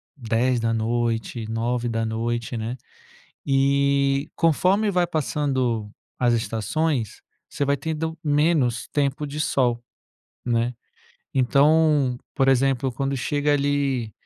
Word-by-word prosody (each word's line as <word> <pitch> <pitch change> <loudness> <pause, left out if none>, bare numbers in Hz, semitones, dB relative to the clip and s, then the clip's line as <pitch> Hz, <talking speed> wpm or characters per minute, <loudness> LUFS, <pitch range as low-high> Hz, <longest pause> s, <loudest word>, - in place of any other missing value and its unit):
22h, 115 -1 -1
21h, 115 0 -2
né. 115 +3 -4 0.7
E, 140 +1 +2
conforme 185 +6 +2
vai 180 -2 +2
passando 130 -8 -1 0.3
as 120 -1 +3
estações, 115 +3 -1 0.3
você 145 - -2
vai 140 0 +1
tendo 160 +2 -4
menos 145 -5 +1
tempo 145 0 -1
de 145 +1 -5
sol, 120 -5 +1 0.6
né. 120 0 0 0.6
Então, 140 0 +3 0.2
por 135 -1 +2
exemplo, 135 0 +2
quando 135 +3 -2
chega 145 +3 0
ali 140 -5 0
135 Hz, 95 wpm, -23 LUFS, 120-145 Hz, 0.7 s, as